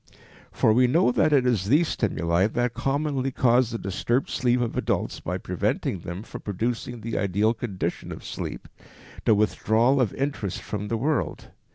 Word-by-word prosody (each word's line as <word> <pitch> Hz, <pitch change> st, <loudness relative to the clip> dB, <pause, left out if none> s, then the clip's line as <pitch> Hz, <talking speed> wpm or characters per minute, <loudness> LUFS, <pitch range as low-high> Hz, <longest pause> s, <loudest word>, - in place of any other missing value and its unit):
For 110 Hz, -, +3 dB
we 125 Hz, +2 st, +5 dB
know 130 Hz, 0 st, +3 dB
that 155 Hz, +5 st, +2 dB
it 135 Hz, -4 st, +4 dB
is 115 Hz, -7 st, +1 dB
these 150 Hz, +8 st, +4 dB
stimuli 90 Hz, -, +1 dB
that 120 Hz, +1 st, -1 dB
commonly 135 Hz, +2 st, -1 dB
cause 125 Hz, -1 st, +3 dB
the 115 Hz, -, -3 dB
disturbed 115 Hz, +6 st, -1 dB
sleep 125 Hz, -1 st, +2 dB
of 120 Hz, -2 st, -1 dB
adults -, -, -1 dB
by -, -, -3 dB
preventing 95 Hz, -, -2 dB
them 85 Hz, +4 st, -6 dB
from -, -, -9 dB
producing 115 Hz, +4 st, -3 dB
the 115 Hz, +1 st, -3 dB
ideal 100 Hz, +3 st, +2 dB
condition 110 Hz, -5 st, -4 dB
of -, -, -8 dB
sleep, -, -, -6 dB, 0.6 s
the 110 Hz, -, +5 dB
withdrawal 110 Hz, +6 st, +2 dB
of 115 Hz, -7 st, +1 dB
interest 135 Hz, -9 st, -2 dB
from 105 Hz, -1 st, -4 dB
the 115 Hz, -, -1 dB
world. 150 Hz, +6 st, -2 dB
115 Hz, 170 wpm, -25 LUFS, 105-130 Hz, 0.6 s, we